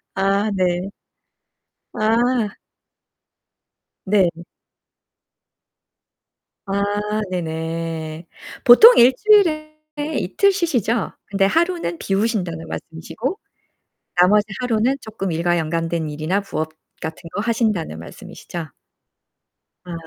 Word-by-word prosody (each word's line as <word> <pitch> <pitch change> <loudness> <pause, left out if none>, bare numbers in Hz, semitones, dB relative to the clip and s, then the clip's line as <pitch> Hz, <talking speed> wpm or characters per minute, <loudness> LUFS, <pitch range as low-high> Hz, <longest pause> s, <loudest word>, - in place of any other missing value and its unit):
아 195 +2 +1
네. 180 +1 0 1.0
아. 225 0 +1 1.5
네. 190 -3 +3 2.3
아 200 +1 -1 0.5
네 180 -1 -2
네. 160 0 -5 0.4
보통 440 - +9
1 245 +2 +8
주일에 320 -8 +3 0.4
이틀 395 - +2
쉬시죠? 245 - 0
근데 195 -1 +1
하루는 335 - 0
비우신다는 195 -5 -1
말씀이시고 225 - -5 0.8
나머지 205 +3 +5 0.2
하루는 245 +2 +1
쪼끔 205 -5 -5
일과 175 +2 +1
연관된 165 0 -2
일이나 155 +7 -1
부업 160 -5 -4 0.3
같은 160 0 -6
거 205 - -1
하신다는 215 - -1
말씀이시죠? 160 - -8 1.2
아. 175 - -8
195 Hz, 190 characters per minute, -21 LUFS, 165-235 Hz, 2.3 s, 보통